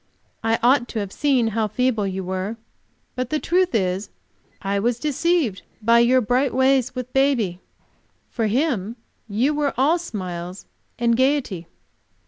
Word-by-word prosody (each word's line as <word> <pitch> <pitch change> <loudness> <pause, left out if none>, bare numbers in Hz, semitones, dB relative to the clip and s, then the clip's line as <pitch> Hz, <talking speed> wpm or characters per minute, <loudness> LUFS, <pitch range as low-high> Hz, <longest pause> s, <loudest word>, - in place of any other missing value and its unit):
I 225 0 +2
ought 250 0 +4
to 225 - -4
have 200 -2 -4
seen 260 -4 +2
how 220 0 0
feeble 225 -2 0
you 190 0 -3
were. 190 +4 -3 0.6
But 255 -1 -3
the 310 - 0
truth 360 0 +1
is, 190 -1 0 0.5
I 200 0 -1
was 235 +3 0
deceived 300 - 0 0.2
by 230 +2 +4
your 250 +2 +4
bright 250 +3 +1
ways 260 -1 +2
with 255 0 -6
baby. 250 -10 +2 0.7
For 225 -3 0
him 230 - 0 0.3
you 240 +9 +1
were 295 -1 -1
all 300 +7 +3
smiles 185 - -6 0.3
and 235 -1 +2
gayety." 255 - 0
235 Hz, 145 wpm, -22 LUFS, 205-270 Hz, 0.7 s, ought